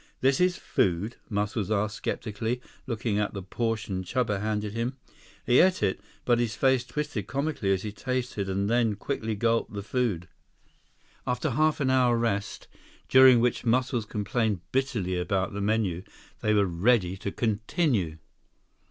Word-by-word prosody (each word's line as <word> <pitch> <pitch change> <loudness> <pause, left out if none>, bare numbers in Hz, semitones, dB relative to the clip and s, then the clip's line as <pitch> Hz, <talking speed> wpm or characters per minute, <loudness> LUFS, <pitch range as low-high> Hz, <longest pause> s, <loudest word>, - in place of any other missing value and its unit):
"This 135 +4 +3
is 180 0 +3
food?" 95 +6 0
Muscles 105 -1 -1
asked 105 0 0
skeptically, 110 +3 -3 0.3
looking 115 -3 -1
at 105 0 -1
the 100 - -5
portion 100 -2 -2
Chuba 105 -1 -1
handed 105 -1 -2
him. 120 +4 -2 0.5
He 120 +1 +5
ate 185 0 +4
it, 95 - 0 0.2
but 120 -1 +3
his 115 -2 0
face 130 -2 +3
twisted 125 -4 -4
comically 140 -7 -1
as 95 -1 +1
he 105 - -4
tasted 125 -3 -3
and 100 +1 0
then 115 -1 +2
quickly 110 -3 -3
gulped 115 +1 0
the 100 -1 -4
food. 105 -7 -1 1.0
131 - - 0
After 125 +4 -1
a - - -2
half 155 +4 +2
hour 130 -3 +3
rest, 110 -4 -2 0.4
during 130 -2 +8
which 120 0 +1
Muscles 125 -1 +1
complained 105 -2 -1
bitterly 115 -9 0
about 95 +2 -1
the 100 - -3
menu, 100 -4 0 0.4
they 110 0 +2
were 100 -1 +4
ready 95 +1 +2
to 100 - -4
continue. 110 - 0
110 Hz, 155 wpm, -27 LUFS, 100-125 Hz, 1.0 s, during